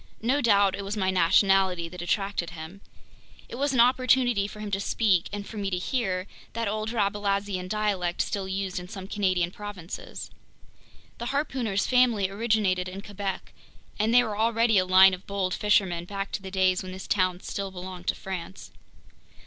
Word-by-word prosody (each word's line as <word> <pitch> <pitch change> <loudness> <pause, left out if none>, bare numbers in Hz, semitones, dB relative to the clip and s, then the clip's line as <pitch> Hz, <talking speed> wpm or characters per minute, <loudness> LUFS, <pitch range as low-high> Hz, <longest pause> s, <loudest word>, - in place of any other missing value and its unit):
No 265 +5 +2
doubt 200 -5 +4
it 200 - -4
was 200 +2 -4
my 190 -2 +1
nationality 185 0 +3
that 180 +1 -9
attracted 195 -1 -1
him. 170 +3 -9 0.7
It - - -12
was 285 +1 +1
an 255 - +1
opportunity 245 -3 +4
for 210 - -11
him 210 -1 -5
to 195 - 0
speak, 200 -3 +1
and 205 0 -5
for 220 - -9
me 200 -1 -2
to 180 - -1
hear, 190 -3 -1 0.3
that 230 -1 -2
old 215 +1 -2
Rabelaisian 200 -3 -1
dialect 195 -4 0
still 195 -2 -3
used 190 -1 -3
in 180 - -9
some 190 -1 -8
Canadian 185 -4 0
provinces. 200 -4 -8 0.9
The 235 - -4
harpooner's 255 -8 -1
family 235 -6 +3
originated 200 -4 +1
in 190 +2 -7
Quebec, 200 -2 -5 0.5
and 215 +2 +2
they 245 +1 +6
were 215 -3 -3
already 230 -1 +3
a 185 - 0
line 190 +1 +7
of 185 +1 -7
bold 195 -2 -1
fishermen 190 -4 +1
back 195 +1 -4
in - - -5
the 190 - -7
days 185 -1 +2
when 185 0 -7
this 190 0 -8
town 185 -3 +1
still 200 -1 -4
belonged 185 -1 -8
to - - +1
France. 190 -1 -7
195 Hz, 180 wpm, -27 LUFS, 185-215 Hz, 0.9 s, line